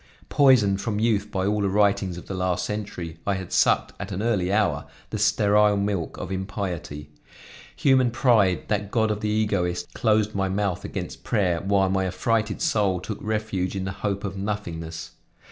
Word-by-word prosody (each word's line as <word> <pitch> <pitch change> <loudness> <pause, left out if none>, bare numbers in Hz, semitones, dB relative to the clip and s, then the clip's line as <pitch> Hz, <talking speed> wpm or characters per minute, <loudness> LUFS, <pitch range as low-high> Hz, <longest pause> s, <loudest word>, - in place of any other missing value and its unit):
Poisoned, 110 -9 +4
from 105 -3 -2
youth, 105 -2 +1
by 95 -2 -1
all 105 +1 +1
the 100 - +1
writings 100 -2 +2
of 90 - -9
the - - -6
last 90 -1 -1
century, 95 -6 -5
I 100 - +2
had 95 -2 -6
sucked, - - +3
at 100 0 -6
an 100 +3 -3
early 100 -6 +1
hour, 75 -9 +1 0.2
the - - -3
sterile 105 0 +3
milk 100 -4 -2
of - - -6
impiety. 95 -6 -4 0.6
Human 130 -3 +3
pride, 115 -7 +3
that 105 -1 -1
God 110 0 +1
of 105 - -2
the 105 - -1
egoist, 105 -5 -1
closed 110 -1 +2
my 95 -1 0
mouth 100 -2 -1
against - - -6
prayer, 90 -7 +1
while 95 -1 +2
my 95 0 +1
affrighted 105 +3 -1
soul 100 -4 +1
took 100 +3 -6
refuge 105 -4 -2
in 95 - -2
the 100 - -3
hope 100 0 -3
of 100 -2 -4
nothingness. 85 -6 -5
100 Hz, 180 wpm, -25 LUFS, 95-105 Hz, 0.6 s, Poisoned